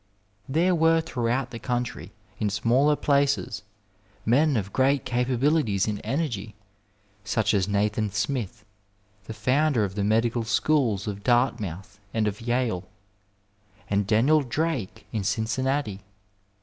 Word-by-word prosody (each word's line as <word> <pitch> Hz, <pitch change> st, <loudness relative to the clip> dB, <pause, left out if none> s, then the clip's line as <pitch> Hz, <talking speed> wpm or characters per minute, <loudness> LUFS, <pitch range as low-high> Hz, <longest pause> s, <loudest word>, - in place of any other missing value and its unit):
There 170 Hz, +6 st, +2 dB
were 165 Hz, -1 st, +4 dB
throughout 125 Hz, -3 st, -1 dB
the 115 Hz, -, -6 dB
country, 125 Hz, -1 st, -3 dB, 0.3 s
in 105 Hz, -, +1 dB
smaller 120 Hz, +8 st, +2 dB
places, 140 Hz, -6 st, +1 dB, 0.6 s
men 140 Hz, +4 st, +3 dB
of 100 Hz, -2 st, -3 dB
great 135 Hz, +1 st, +2 dB
capabilities 125 Hz, -3 st, +1 dB
and 105 Hz, -1 st, -3 dB
energy, 115 Hz, -9 st, -3 dB, 0.7 s
such 105 Hz, +2 st, 0 dB
as 100 Hz, -2 st, +2 dB
Nathan 105 Hz, +1 st, 0 dB
Smith, 105 Hz, +1 st, -3 dB, 0.6 s
the 110 Hz, -, -6 dB
founder 135 Hz, -2 st, +2 dB
of 95 Hz, -2 st, -2 dB
the 100 Hz, 0 st, -2 dB
Medical 115 Hz, +3 st, +1 dB
Schools 115 Hz, -3 st, +1 dB
of 100 Hz, -2 st, -5 dB
Dartmouth 105 Hz, -6 st, 0 dB, 0.2 s
and 110 Hz, -1 st, +1 dB
of 105 Hz, +1 st, -4 dB
Yale, 115 Hz, -6 st, -1 dB, 1.0 s
and 100 Hz, -1 st, +1 dB
Daniel 130 Hz, +9 st, +4 dB
Drake 130 Hz, -, -3 dB
in 110 Hz, -3 st, -2 dB
Cincinnati. 115 Hz, +1 st, -1 dB
115 Hz, 125 wpm, -26 LUFS, 105-135 Hz, 1.0 s, were